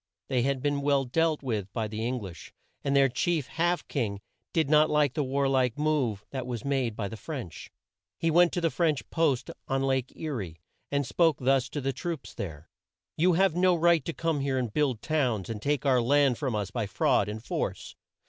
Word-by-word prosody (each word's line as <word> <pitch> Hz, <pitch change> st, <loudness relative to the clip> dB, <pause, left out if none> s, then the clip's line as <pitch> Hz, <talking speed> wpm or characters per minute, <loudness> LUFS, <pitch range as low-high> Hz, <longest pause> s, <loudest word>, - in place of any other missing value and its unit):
They 130 Hz, -3 st, +2 dB
had 135 Hz, 0 st, 0 dB
been 145 Hz, -1 st, 0 dB
well 140 Hz, -1 st, +2 dB
dealt 155 Hz, +4 st, +1 dB
with 105 Hz, -7 st, -2 dB
by 110 Hz, -2 st, -1 dB
the 110 Hz, +1 st, -4 dB
Eng 125 Hz, +2 st, -1 dB
lish, 90 Hz, -6 st, -9 dB, 0.3 s
and 140 Hz, 0 st, 0 dB
their 135 Hz, -1 st, +6 dB
chief, 150 Hz, +4 st, 0 dB
Half 175 Hz, +4 st, -1 dB
King 105 Hz, -8 st, -2 dB, 0.3 s
did 160 Hz, -4 st, +1 dB
not 155 Hz, +1 st, +5 dB
like 150 Hz, -3 st, +2 dB
the 150 Hz, -, 0 dB
war 140 Hz, +1 st, 0 dB
like 130 Hz, -2 st, +1 dB
move 135 Hz, -9 st, 0 dB
that 130 Hz, -2 st, -4 dB
was 120 Hz, -2 st, -5 dB
made 135 Hz, -5 st, 0 dB
by 105 Hz, -2 st, -3 dB
the 110 Hz, -, -7 dB
French. 120 Hz, -, -7 dB, 0.5 s
He 165 Hz, -, +1 dB
went 175 Hz, +1 st, +5 dB
to 175 Hz, -, -1 dB
the 165 Hz, -1 st, +1 dB
French 160 Hz, -5 st, 0 dB
post 155 Hz, -7 st, +1 dB, 0.2 s
on 135 Hz, 0 st, 0 dB
Lake 130 Hz, -2 st, 0 dB
E 160 Hz, -, -5 dB
rie, 100 Hz, -, -4 dB, 0.4 s
and 140 Hz, -1 st, +1 dB
spoke 165 Hz, +2 st, +2 dB
thus 135 Hz, 0 st, +2 dB
to 145 Hz, -, -4 dB
the 135 Hz, +1 st, -1 dB
troops 165 Hz, +2 st, -5 dB
there: 80 Hz, -7 st, -7 dB, 0.5 s
"You 180 Hz, +3 st, +3 dB
have 190 Hz, -1 st, +3 dB
no 180 Hz, 0 st, +4 dB
right 170 Hz, -2 st, +3 dB
to -, -, -2 dB
come 165 Hz, -2 st, -1 dB
here 135 Hz, -1 st, 0 dB
and 120 Hz, -5 st, -2 dB
build 135 Hz, -7 st, 0 dB
towns, 125 Hz, -, 0 dB
and 105 Hz, -2 st, -5 dB
take 145 Hz, +2 st, 0 dB
our 130 Hz, -3 st, +4 dB
land 140 Hz, +1 st, +3 dB
from 130 Hz, -6 st, -1 dB
us 100 Hz, -2 st, -2 dB
by 110 Hz, -1 st, -2 dB
fraud 100 Hz, +1 st, +2 dB
and 110 Hz, +1 st, -6 dB
force. -, -, -3 dB
135 Hz, 215 wpm, -28 LUFS, 120-155 Hz, 0.5 s, their